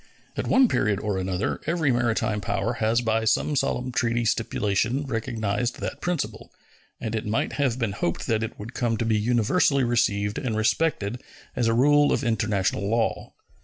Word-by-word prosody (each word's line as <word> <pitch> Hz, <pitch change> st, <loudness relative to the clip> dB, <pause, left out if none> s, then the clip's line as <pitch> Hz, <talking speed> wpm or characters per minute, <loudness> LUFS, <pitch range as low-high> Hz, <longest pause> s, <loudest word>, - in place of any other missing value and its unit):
At -, -, -3 dB
one 260 Hz, 0 st, +5 dB
period 100 Hz, -, +1 dB
or 105 Hz, -3 st, -2 dB
another 95 Hz, +2 st, -2 dB
every 160 Hz, -4 st, +1 dB
maritime 115 Hz, -3 st, 0 dB
power 100 Hz, +4 st, -1 dB
has 115 Hz, +2 st, +2 dB
by 110 Hz, -1 st, 0 dB
some 130 Hz, +6 st, +1 dB
solemn 125 Hz, -1 st, -1 dB
treaty 120 Hz, -1 st, 0 dB
stipulation 115 Hz, +4 st, 0 dB
recognized 115 Hz, -2 st, -2 dB
that -, -, -5 dB
principle, 175 Hz, -4 st, -3 dB, 0.5 s
and 110 Hz, -, -4 dB
it 110 Hz, -1 st, -3 dB
might 110 Hz, +2 st, -1 dB
have 130 Hz, -4 st, +1 dB
been 115 Hz, -5 st, -1 dB
hoped 85 Hz, -4 st, -2 dB
that 110 Hz, -1 st, 0 dB
it 110 Hz, -, -4 dB
would 110 Hz, +4 st, -8 dB
come 115 Hz, -2 st, 0 dB
to 115 Hz, -, -1 dB
be 110 Hz, -1 st, +2 dB
universally 125 Hz, -, +2 dB
received 105 Hz, -4 st, +1 dB
and 120 Hz, -6 st, -2 dB
respected 120 Hz, -1 st, 0 dB, 0.3 s
as 120 Hz, -2 st, +1 dB
a 115 Hz, -, +2 dB
rule 145 Hz, +3 st, +4 dB
of -, -, 0 dB
international 105 Hz, -3 st, 0 dB
law. 115 Hz, 0 st, -1 dB
115 Hz, 170 wpm, -25 LUFS, 105-125 Hz, 0.5 s, one